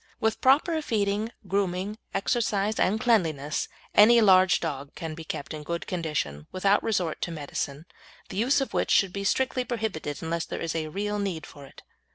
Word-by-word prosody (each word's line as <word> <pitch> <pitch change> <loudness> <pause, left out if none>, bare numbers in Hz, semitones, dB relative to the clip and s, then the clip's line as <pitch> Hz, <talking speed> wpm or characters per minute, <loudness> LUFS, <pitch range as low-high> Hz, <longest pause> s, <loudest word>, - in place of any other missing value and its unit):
With 220 0 0
proper 310 +5 +4
feeding, 210 -3 -1 0.2
grooming, 195 +2 -1
exercise, 210 0 0
and 210 +4 +2
cleanliness, 160 - +1 0.3
any 235 +3 +7
large 190 -3 +5
dog 140 -4 -5
can 160 -1 -5
be 165 +1 -8
kept 150 -2 -5
in 155 - -6
good 170 +3 -4
condition 150 - -3
without 195 +2 +2
resort 185 -8 -1
to - - -1
medicine, 145 -1 -4 0.4
the - - -6
use 255 +6 +3
of 270 - -3
which - - 0
should 195 -2 +3
be 200 - -3
strictly 255 +4 +1
prohibited 215 - -4
unless 165 0 -2
there - - -5
is 165 -2 -2
real 195 +7 -2
need 185 -6 -3
for 140 -1 -12
it. - - -16
190 Hz, 175 wpm, -27 LUFS, 160-220 Hz, 0.4 s, any